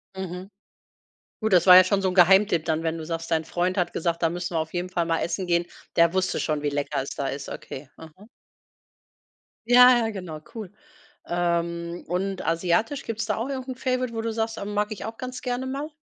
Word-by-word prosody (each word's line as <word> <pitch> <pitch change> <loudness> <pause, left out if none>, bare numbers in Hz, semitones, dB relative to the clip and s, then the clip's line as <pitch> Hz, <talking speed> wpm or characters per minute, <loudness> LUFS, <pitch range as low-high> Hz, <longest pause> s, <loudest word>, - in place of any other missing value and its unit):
Mhm. 185 0 -6 0.9
Gut, 220 -2 0
das 175 0 +5
war 180 - +10
ja 185 - +10
schon 195 +2 +1
so 190 - +2
'n - - -3
Geheimtipp 180 -2 +5
dann, 160 0 -1
wenn 165 0 -1
du - - -6
sagst, 165 +1 -5
dein 160 -1 +1
Freund 180 +3 -1
hat 180 - 0
gesagt: 170 0 -1
„Da 165 - +3
müssen 175 +1 -4
wir 160 - +2
auf 160 0 -4
jeden 180 0 -3
Fall 175 -2 -1
mal 165 0 0
essen 185 +2 -2
gehen.“ 170 0 +2 0.3
Der 170 0 +4
wusste 190 0 0
schon, 155 -2 -1
wie 145 - 0
lecker 145 0 -2
es 135 - -6
da 140 - -2
ist. 140 0 -5
Okay, 135 +1 -8
aha. 165 +6 -14 1.4
Ja, 245 -2 +7
genau, 180 -6 -7 0.2
cool. 210 -5 -7 0.5
Ähm, 170 0 -2
und 185 +2 -2
asiatisch, 185 - 0
gibt's 225 0 -3
da 215 -2 -1
auch 235 +5 -3
irgend 260 -1 -5
'n 260 - -4
favorite, 255 -1 -1
wo 225 - -3
du 225 0 -2
sagst, 225 0 -2
ähm: 205 0 -5
„Mag 210 +1 0
ich - - -8
auch 225 +1 -7
ganz 255 -1 -6
gerne 250 0 -3
mal?“ 280 +3 -4
180 Hz, 215 wpm, -25 LUFS, 170-225 Hz, 1.4 s, war